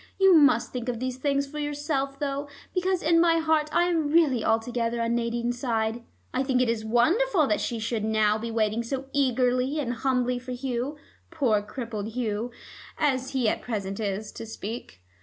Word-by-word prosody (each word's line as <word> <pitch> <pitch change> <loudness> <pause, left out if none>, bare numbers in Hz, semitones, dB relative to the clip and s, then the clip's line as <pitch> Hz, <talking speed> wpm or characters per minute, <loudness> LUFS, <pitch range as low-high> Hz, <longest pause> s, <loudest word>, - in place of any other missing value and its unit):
You 385 -1 +6
must 285 -7 +5
think 250 -1 -3
of 235 -2 -3
these 255 0 -3
things 280 +1 0
for 300 +2 -7
yourself, 290 -2 -2
though, 280 0 -2 0.3
because 370 0 0
in 330 +1 +4
my 335 -1 +4
heart 315 -2 +2
I 345 +2 +3
am 330 -4 +1
really 290 -8 +3
altogether 230 +1 0
on 230 0 0
Nadine's 240 +1 -1
side. 225 -2 -1 0.3
I 255 - +1
think 260 -2 +1
it 250 -2 +2
is 225 -1 -1
wonderful 320 - +3
that 210 -6 0
she 235 - -2
should 225 -1 -2
now 215 -1 +2
be 230 +1 -4
waiting 220 0 0
so 265 +3 -4
eagerly 255 +1 +1
and 245 -4 -1
humbly 250 0 0
for 255 0 -6
Hugh, 255 +3 -3 0.3
poor 260 -11 +1
crippled 220 -1 -5
Hugh, 230 -1 -2 0.5
as 270 -3 0
he 255 -4 +1
at - - 0
present 200 -4 -4
is, 205 0 -3
to 225 - -8
speak. 215 - -7
250 Hz, 185 wpm, -26 LUFS, 230-285 Hz, 0.5 s, You